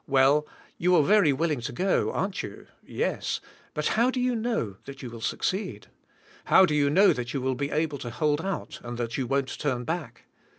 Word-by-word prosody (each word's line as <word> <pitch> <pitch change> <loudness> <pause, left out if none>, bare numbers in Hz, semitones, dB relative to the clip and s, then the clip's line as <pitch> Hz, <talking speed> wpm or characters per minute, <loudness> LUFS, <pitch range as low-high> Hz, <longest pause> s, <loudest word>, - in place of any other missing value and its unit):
Well, 140 +2 +4 0.3
you 180 +1 +4
are 155 - +5
very 200 -2 +5
will 160 +4 0
ing 140 -5 -1
to 115 - -4
go, 185 +9 +1
aren't 195 0 -2
you? 100 - -9 0.2
Yes. - - -2 0.4
But 150 - 0
how 235 +3 +3
do 255 - -2
you 250 0 +1
know 220 - -2
that 135 -1 -9
you 120 - -6
will 115 -1 -9
succeed? 150 - -2 0.6
How 190 - +7
do 155 - -1
you 145 -1 +3
know 195 +7 +5
that 120 +2 -5
you - - +1
will 130 +1 0
be 140 +3 -2
able 155 -2 -1
to 120 - -5
hold 150 +4 0
out 195 +1 -4
and 120 0 -6
that 115 -1 -3
you 130 - -1
won't 135 0 -1
turn 130 -5 -1
]back? 165 -1 -4
145 Hz, 215 wpm, -27 LUFS, 125-180 Hz, 0.6 s, How